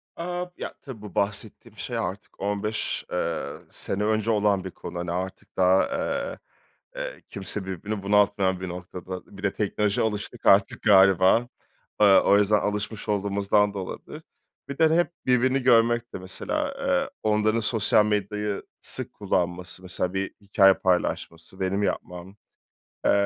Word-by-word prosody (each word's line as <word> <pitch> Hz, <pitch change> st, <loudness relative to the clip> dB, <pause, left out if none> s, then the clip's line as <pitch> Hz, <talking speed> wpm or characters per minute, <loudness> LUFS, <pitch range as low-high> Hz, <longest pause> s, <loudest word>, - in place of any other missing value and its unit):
A! 175 Hz, +1 st, -3 dB
ya -, -, -5 dB
tabii 130 Hz, -7 st, -9 dB
bu 105 Hz, 0 st, -10 dB
bahsettiğim 105 Hz, +1 st, -2 dB
şey -, -, -4 dB
artık 95 Hz, +4 st, -5 dB
15, 105 Hz, +2 st, -2 dB
ııı, 85 Hz, -2 st, -3 dB
sene 100 Hz, +2 st, -1 dB
önce 110 Hz, +1 st, +1 dB
olan 105 Hz, -3 st, +2 dB
bir 95 Hz, -, -6 dB
konu. 85 Hz, -, -7 dB
Hani 85 Hz, -1 st, -3 dB
artık 95 Hz, +2 st, -5 dB
daha, 95 Hz, +1 st, +4 dB
eee, 280 Hz, 0 st, -3 dB, 0.6 s
eee, -, -, -6 dB
kimse 95 Hz, 0 st, -4 dB
birbirini 100 Hz, +2 st, -5 dB
bunaltmayan 100 Hz, -2 st, +2 dB
bir 95 Hz, -, -4 dB
noktada. 90 Hz, +2 st, -8 dB
Bir 100 Hz, -, -11 dB
de 100 Hz, -, +1 dB
teknolojiye 105 Hz, +1 st, 0 dB
alıştık 110 Hz, +2 st, -6 dB
artık 100 Hz, 0 st, +4 dB
galiba, 95 Hz, +2 st, +5 dB, 0.5 s
ııı, 100 Hz, -2 st, +8 dB
o 100 Hz, -, +5 dB
yüzden 105 Hz, +1 st, +4 dB
alışmış 105 Hz, +1 st, -3 dB
olduğumuzdan 100 Hz, 0 st, +1 dB
da 100 Hz, -, -4 dB
olabilir. 95 Hz, -, -8 dB, 0.5 s
Bir 140 Hz, -, -5 dB
de 160 Hz, 0 st, +4 dB
hep 175 Hz, 0 st, +2 dB
birbirini 130 Hz, +1 st, +2 dB
görmek 120 Hz, -1 st, +3 dB
de -, -, -5 dB
mesela, 275 Hz, -, -3 dB
ııı, 275 Hz, 0 st, +1 dB
onların 110 Hz, +1 st, +2 dB
sosyal 110 Hz, -1 st, +3 dB
medyayı 105 Hz, 0 st, -1 dB, 0.2 s
sık -, -, -1 dB
kullanması, 90 Hz, -2 st, -2 dB
mesela 90 Hz, 0 st, -2 dB
bir 95 Hz, 0 st, -2 dB
hikâye 95 Hz, -1 st, +5 dB
paylaşması, 90 Hz, -1 st, -2 dB
benim 95 Hz, +2 st, 0 dB
yapmam, 90 Hz, 0 st, -4 dB, 0.7 s
eee, -, -, +5 dB
100 Hz, 145 wpm, -25 LUFS, 95-110 Hz, 0.7 s, ııı